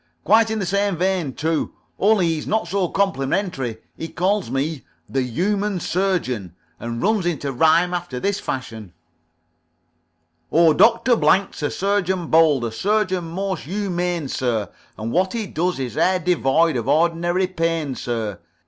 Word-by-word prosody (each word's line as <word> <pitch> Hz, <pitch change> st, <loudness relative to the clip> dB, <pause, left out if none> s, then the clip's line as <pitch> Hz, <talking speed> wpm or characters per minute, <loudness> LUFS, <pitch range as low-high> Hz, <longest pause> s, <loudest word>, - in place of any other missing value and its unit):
"Quite 225 Hz, +2 st, +4 dB
in 220 Hz, -, -1 dB
the 200 Hz, -, -2 dB
same 200 Hz, 0 st, 0 dB
vein, 180 Hz, -6 st, 0 dB
too, 160 Hz, 0 st, -1 dB, 0.2 s
only 205 Hz, -2 st, +4 dB
he's 160 Hz, -2 st, -1 dB
not 220 Hz, -4 st, 0 dB
so 190 Hz, +1 st, 0 dB
complimentary. 140 Hz, -, -1 dB, 0.2 s
He 165 Hz, -, -5 dB
calls 190 Hz, +4 st, 0 dB
me 140 Hz, +2 st, -2 dB, 0.3 s
'The 135 Hz, -, -1 dB
Humane 195 Hz, -, -1 dB
Surgeon,' 160 Hz, -, -1 dB, 0.2 s
and 115 Hz, 0 st, -4 dB
runs 205 Hz, -3 st, +1 dB
into 145 Hz, -5 st, -2 dB
rhyme 160 Hz, +6 st, +3 dB
after 175 Hz, -8 st, -4 dB
this 200 Hz, +7 st, -1 dB
fashion: 110 Hz, -8 st, -6 dB, 1.6 s
"O, 165 Hz, -1 st, +5 dB
Doctor 230 Hz, +7 st, +4 dB
Blank's 195 Hz, -5 st, +2 dB
a 145 Hz, -, 0 dB
surgeon 190 Hz, -3 st, -1 dB
bold, 155 Hz, -6 st, +4 dB
A 115 Hz, -, -3 dB
surgeon 190 Hz, -, 0 dB
most 185 Hz, 0 st, -4 dB
humane, 180 Hz, -3 st, -2 dB
sir; 115 Hz, -7 st, -1 dB, 0.3 s
And 110 Hz, +2 st, -4 dB
what 185 Hz, +5 st, +1 dB
he 230 Hz, -2 st, -2 dB
does 180 Hz, 0 st, -1 dB
is 125 Hz, -4 st, -4 dB
e'er 185 Hz, 0 st, +3 dB
devoid 165 Hz, -3 st, +2 dB
Of 115 Hz, -, -3 dB
ordinary 170 Hz, +3 st, +2 dB
pain, 165 Hz, -5 st, -1 dB
sir. 115 Hz, -5 st, -4 dB
170 Hz, 150 wpm, -21 LUFS, 135-190 Hz, 1.6 s, O